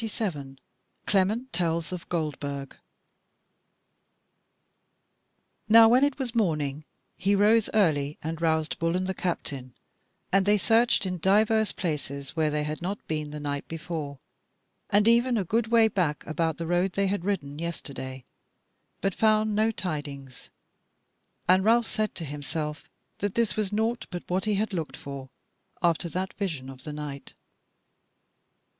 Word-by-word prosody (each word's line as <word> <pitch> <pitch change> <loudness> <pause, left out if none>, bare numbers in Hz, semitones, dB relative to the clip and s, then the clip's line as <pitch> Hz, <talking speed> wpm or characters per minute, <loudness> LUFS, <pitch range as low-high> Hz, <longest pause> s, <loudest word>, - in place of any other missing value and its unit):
CHAPTER 225 -2 -4
27 140 -7 -5 0.5
Clement 210 +6 +1
Tells 170 -1 0
of 180 -2 -6
Goldburg 145 -4 -3 2.9
Now 225 +1 +9
when 250 +3 +5
it 285 -1 +2
was 260 -4 -3
morning 155 - 0 0.3
he 200 +2 +2
rose 215 +2 +4
early 150 -8 +2
and 160 +1 -4
roused 160 -1 +1
Bull 165 +1 +1
and 185 +1 0
the 190 - -1
captain, 140 -9 -4 0.6
and 195 0 +3
they 210 0 +5
searched 225 +1 +3
in 180 -1 -3
divers 215 +4 +3
places 140 -5 -4
where 160 -2 +2
they 150 0 0
had 150 +2 -4
not 195 +4 -4
been 155 -1 -2
the 150 0 -6
night 145 -1 -3
before, 155 -3 -5 0.7
and 205 +2 +4
even 235 +1 +4
a 205 - +1
good 230 +5 +1
way 230 -1 +5
back 175 -8 -1
about 160 0 -1
the 165 - -4
road 175 +2 +1
they 200 - +1
had 195 -2 -1
ridden 150 -7 -2
yesterday, 135 -6 -5 0.8
but 195 -1 +1
found 215 0 +3
no 215 +2 +3
tidings. 145 - -5 1.0
And 185 +1 +5
Ralph 230 +2 +4
said 215 -1 -1
to 165 - -4
himself 150 +1 -4 0.3
that 205 -1 -2
this 230 -5 +1
was 210 -2 -1
naught 225 +3 0
but 175 -2 -5
what 185 +2 0
he 210 -1 +1
had 215 +1 -1
looked 165 -4 -3
for 135 -1 -8 0.5
after 170 0 +2
that 185 +4 -3
vision 155 -10 -3
of 130 -1 -11
the 150 - -4
night. 145 -2 -7
175 Hz, 150 wpm, -27 LUFS, 150-210 Hz, 2.9 s, Now